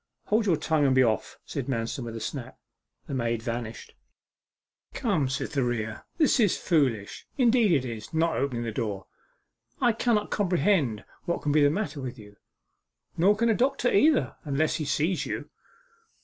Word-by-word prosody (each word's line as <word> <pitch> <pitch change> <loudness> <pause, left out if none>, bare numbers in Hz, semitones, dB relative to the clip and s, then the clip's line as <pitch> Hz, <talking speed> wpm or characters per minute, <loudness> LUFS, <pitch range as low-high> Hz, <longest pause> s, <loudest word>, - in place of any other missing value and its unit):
'Hold 215 +1 +2
your 170 -5 +3
tongue, 155 -1 +1
and 130 - +3
be 130 - +6
off!' 110 -5 -1
said - - -4
Manston 120 0 -2
with 115 -1 -6
a - - -4
snap. 130 +1 -6 0.5
The - - -7
maid 115 -3 -1
vanished. 115 -1 -5 1.0
'Come, 170 - 0
Cytherea, 120 -5 -2
this 305 -5 +3
is 210 -6 +3
foolish 130 - 0
indeed 240 -5 +4
it 140 -6 +2
is 115 -3 -7
not 165 +1 +1
opening 125 -3 -1
the 115 - -3
door.... 105 -4 -3 0.7
I 240 - +4
cannot 225 -2 0
comprehend 175 - +1 0.2
what 170 -1 -2
can 150 - +1
be 150 +1 +4
the 145 - +6
matter 165 -3 -3
with 130 -1 -6
you. 105 -2 -14 0.8
Nor 195 +5 +4
can 235 +1 +2
a - - +5
doctor 255 +2 +1
either, 295 +7 +3
unless 150 0 0
he 155 - -3
sees 160 +5 0
you. - - -5
145 Hz, 165 wpm, -27 LUFS, -, 1.0 s, be